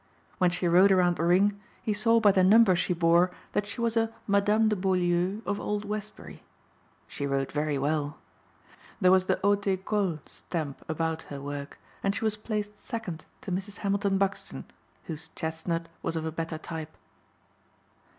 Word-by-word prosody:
When 180 -2 +4
she 180 0 -1
rode 185 +4 +6
around 180 -2 +3
the - - -1
ring 200 +4 +3 0.2
he 215 - 0
saw 230 +2 +4
by 210 -2 +6
the 190 -1 +3
number 205 0 +6
she 175 - 0
bore 170 +1 +4 0.2
that 205 - -1
she 235 - -5
was 230 -1 0
a 225 0 +2
Madame 205 +2 +3
de 215 - +2
Beaulieu 185 +1 +1
of 205 0 -1
Old 210 0 -2
Westbury. 210 0 -6 0.7
She 140 - -4
rode 135 -1 -1
very 150 -1 0
well. 145 +1 -1 0.8
There 185 -3 +5
was 185 0 +4
the - - +1
haute 200 0 +2
école 190 -2 0
stamp 155 -5 -5
about 160 0 -1
her 140 - -6
work 140 0 -6 0.2
and 200 0 0
she - - -3
was 215 -1 +2
placed 210 -1 -4
second 190 -9 -5 0.2
to 195 - -6
Mrs. 195 +2 -3
Hamilton 200 0 +1
Buxton 195 0 -2 0.4
whose 160 0 -5
chestnut 165 +1 -3
was 165 - -2
of 160 -1 -2
a 160 - -2
better 165 0 -4
type. 160 -1 -7
185 Hz, 170 wpm, -28 LUFS, 160-205 Hz, 0.8 s, rode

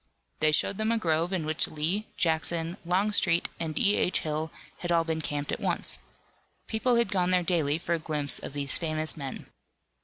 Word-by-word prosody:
They 155 - +4
showed 190 +6 0
them 220 +1 +1
a 230 - +2
grove 165 -3 0
in 180 -5 -1
which 155 0 +1
Lee, 170 +8 -1
Jackson, 165 +1 +1
Longstreet 180 -1 +2
and 160 -2 -3
D. 210 -3 +4
H. 180 - +2
Hill 155 +1 -2 0.3
had 175 - -3
all 165 -1 +4
been 160 -1 -2
camped 145 -1 -3
at - - -2
once. - - 0 0.7
People 230 +3 +1
had 235 -3 +2
gone 180 -3 +1
there 180 -1 +3
daily 160 -4 +1
for 170 +1 -2
a 170 - 0
glimpse 150 -4 -1
of - - -8
these 140 -1 +2
famous 155 -1 0
men. 140 -4 -6
165 Hz, 190 wpm, -28 LUFS, 155-185 Hz, 0.7 s, They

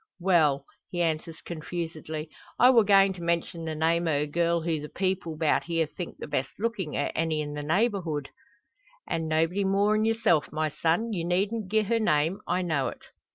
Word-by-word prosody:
well 155 -7 +3
" - - -54
he 175 - -4
answers 160 -1 -1
confusedly; 160 -2 -5 0.3
"I 250 +1 +7
wor 235 -3 +6
goin' 195 -1 +5
to 180 - -10
mention 170 0 -1
the 160 -1 -3
name 165 +2 +1
o' 145 -2 +1
a - - -1
girl 170 +2 +1
who 160 -1 -1
the 150 0 -7
people 185 -4 -2
'bout 155 -1 +1
here 165 -1 +1
think 170 +3 -7
the - - -6
best 135 +1 -1
lookin' 205 -8 -2
o' - - -1
any 160 -1 0
in 145 -1 -3
the 150 - -4
neighbourhood 165 - 0 0.4
" - - -34
"An' 160 -1 -2
nobody 165 +5 +1
more'n 205 +2 +2
yourself, 220 -8 +2
my 155 +1 -1
son. 170 +9 0
You 175 -4 -2
needn't 195 +4 0
gi'e 215 +1 +3
her 230 +3 +1
name. 165 -2 +1
I 185 - 0
know 155 -6 0
it." - - -7
170 Hz, 200 wpm, -27 LUFS, 155-195 Hz, 0.4 s, I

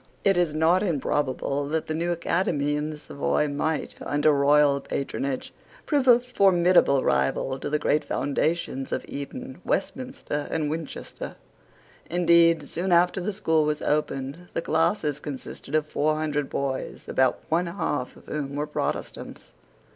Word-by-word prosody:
It 195 - +4
was 175 -3 +2
not 160 +4 +3
improbable 145 -5 -1
that 160 +2 -1
the 155 - -3
new 170 +2 -1
academy 165 -4 0
in 150 +1 -2
the 155 - -6
Savoy 150 0 -1
might, 150 +2 -2
under 145 +1 +2
royal 145 0 +4
patronage, 135 -1 -3 0.3
prove 285 -4 +1
a 240 -2 +9
formidable 185 - +4
rival 70 - +1
to - - -4
the 150 - +1
great 150 0 +1
foundations 145 -2 -1
of - - -2
Eton, 255 - -7
Westminster, 255 - -2
and 155 -2 -1
Winchester. 160 -2 -6 0.8
Indeed, 170 -2 +4
soon 180 +6 -2
after 175 +2 +4
the 200 +4 -1
school 160 -6 +1
was 150 0 -1
opened, 150 +2 -1
the 165 - -1
classes 160 -2 +1
consisted 140 0 -6
of 155 -1 +2
four 155 0 0
hundred 150 -2 -1
boys, 135 -1 -3
about 130 -1 +2
one 170 +2 +1
half 145 -7 -2
of - - -17
whom 140 -2 -4
were 145 +1 -1
Protestants. 150 - -4
155 Hz, 145 wpm, -26 LUFS, 145-170 Hz, 0.8 s, a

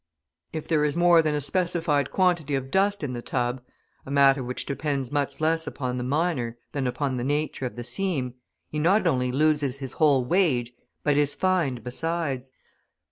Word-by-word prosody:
If 155 - -5
there 155 -3 +2
is 150 +2 0
more 175 -1 +6
than 155 -2 0
a - - 0
specified 165 -1 +1
quantity 175 -6 +1
of 135 0 -4
dust 200 0 +2
in 130 -3 -2
the 120 - -4
tub, 125 +1 -2 0.4
a - - -11
matter 140 -1 +4
which 125 +1 -4
depends 140 -3 -2
much 145 -1 -1
less 160 0 +1
upon 125 -3 -3
the 125 - -2
miner 130 -4 -1
than 135 -3 -1
upon 130 +1 -1
the 120 - -2
nature 145 -1 -1
of - - -10
the 120 - -5
seam, 135 -2 -2 0.4
he 150 - -2
not 185 +8 +3
only 125 -1 +1
loses 145 -1 +2
his 135 -2 -5
whole 140 -5 +3
wage 130 -7 +1 0.3
but 145 -1 +2
is 145 -1 +2
fined 170 - 0
besides. 135 -1 -2
145 Hz, 185 wpm, -26 LUFS, 130-160 Hz, 0.4 s, more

